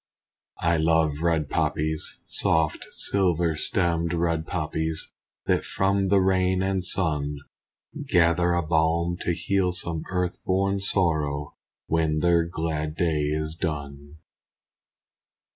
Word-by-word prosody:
I 85 0 +3
love 80 -2 +2
red 80 -3 +1
poppies! 80 +2 -1
Soft 80 -1 0
silver 85 -4 0
stemmed, 85 +2 +1
red 85 -1 0
poppies, 80 -1 -2 0.3
That - - +1
from 95 0 0
the 100 +1 +4
rain 95 0 +2
and 95 -1 0
sun 75 -6 0 0.7
Gather 85 0 +3
a 85 0 +1
balm 85 +2 +1
to 85 - 0
heal 95 -1 0
some 85 -2 -2
earth 90 -1 -2
born 95 +1 +1
sorrow, 75 -7 0 0.3
When 80 -1 +1
their 85 +1 +3
glad 80 -2 -3
day 80 -3 +1
is 75 +1 -2
done. 75 -3 -5
85 Hz, 115 wpm, -25 LUFS, 80-90 Hz, 0.7 s, the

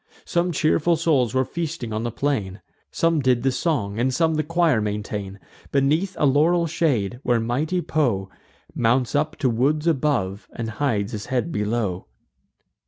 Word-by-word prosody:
Some 175 +1 0
cheerful 170 -1 +2
souls 130 -7 +1
were 130 0 +2
feasting 160 -9 -4
on 110 - -2
the 120 - -2
plain; 105 -7 -2 0.3
Some 165 -1 +1
did 125 -3 +2
the 135 - +2
song, 120 -9 -1
and 130 +2 +2
some 160 +5 +2
the 155 - +1
choir 165 -6 +2
maintain, 105 -1 -4 0.3
Beneath 155 +8 +1
a - - +2
laurel 160 +5 +3
shade, 135 - 0
where 120 -4 +2
mighty 150 +10 -1
Po 115 -11 0 0.5
Mounts 120 +2 +1
up 155 +2 0
to 135 - 0
woods 140 +6 +1
above, 135 - 0
and 115 -1 -4
hides 110 -4 -1
his 105 -2 -6
head 130 +6 -1
below. 105 - -2
130 Hz, 160 wpm, -23 LUFS, 110-155 Hz, 0.5 s, laurel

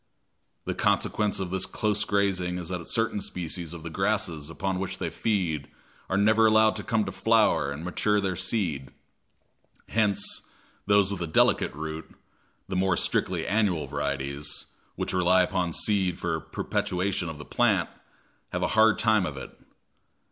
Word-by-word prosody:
The - - -1
consequence 105 -2 +1
of 95 -2 -3
this 95 -1 0
close 105 -1 0
grazing 95 -3 0
is 90 -1 -5
that 90 -2 -5
certain 115 -2 0
species 85 -2 -4
of 85 -2 -8
the 85 - -6
grasses 95 -6 -1
upon 95 +2 -2
which 95 - -3
they - - -3
feed 90 -10 -1 0.4
are 95 - +1
never 110 +2 +5
allowed 110 0 +4
to 105 - -4
come 110 -2 +1
to - - -4
flower 105 -10 +2
and 75 +4 -6
mature 105 +3 +1
their 95 -2 -1
seed; 90 - -1 1.0
hence 105 -3 0 0.5
those 100 -1 +4
with 95 -3 -4
a 85 - -1
delicate 80 - +3
root, 80 +1 -6 0.5
the - - -4
more 95 -1 +2
strictly - - 0
annual 100 -8 +1
varieties, 70 +2 -3 0.3
which - - -3
rely 90 0 +4
upon 90 -1 -1
seed 95 -1 0
for - - -2
perpetuation 90 -1 -2
of 80 - -7
the 75 - -9
plant, - - +2 0.6
have - - -2
a - - +1
hard 110 0 +5
time 110 -4 +3
of 70 - -6
it. 65 - -7
95 Hz, 160 wpm, -27 LUFS, 85-105 Hz, 1.0 s, never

